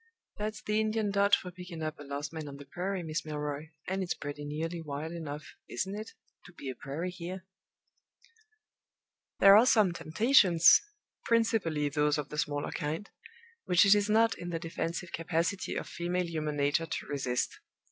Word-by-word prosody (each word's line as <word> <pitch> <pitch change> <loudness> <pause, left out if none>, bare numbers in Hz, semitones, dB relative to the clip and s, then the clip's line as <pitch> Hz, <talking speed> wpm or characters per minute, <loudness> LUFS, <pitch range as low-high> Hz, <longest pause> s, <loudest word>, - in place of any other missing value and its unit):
That's 215 +1 -4
the 210 +1 +1
Indian 215 -1 0
dodge 200 0 +5
for 180 - -7
picking 180 -2 -8
up 155 -1 -4
a - - -8
lost 145 +2 -5
man 160 -2 -5
on 140 -1 -8
the 140 - -11
prairie, 185 +2 -3
Miss 155 0 -3
Milroy 150 0 -4 0.2
and 190 +1 -1
it's 180 - -1
pretty 145 0 -6
nearly 165 +3 -3
wild 150 +1 -5
enough 155 -3 -7 0.2
(isn't 190 0 -2
it?) 215 +2 -6 0.3
to 175 - -14
be 140 -5 -6
a - - -9
prairie 160 +6 -4
here!" 185 +1 -7 1.9
There 195 0 +8
are 225 +4 +7
some 215 -7 +5
temptations 170 - +5 0.4
principally 215 -10 +2
those 150 +1 +1
of 145 -2 -4
the 150 - -4
smaller 145 -1 -1
kind 155 +7 -4 0.5
which 180 0 +5
it 200 - +8
is 205 0 +2
not 225 0 +4
in 175 - -5
the 170 - -2
defensive 165 +1 -4
capacity 170 +3 -1
of - - -3
female 175 +1 -2
human 155 -3 -3
nature 145 +3 +1
to - - -4
resist. 130 -4 -2
165 Hz, 175 wpm, -31 LUFS, 150-195 Hz, 1.9 s, There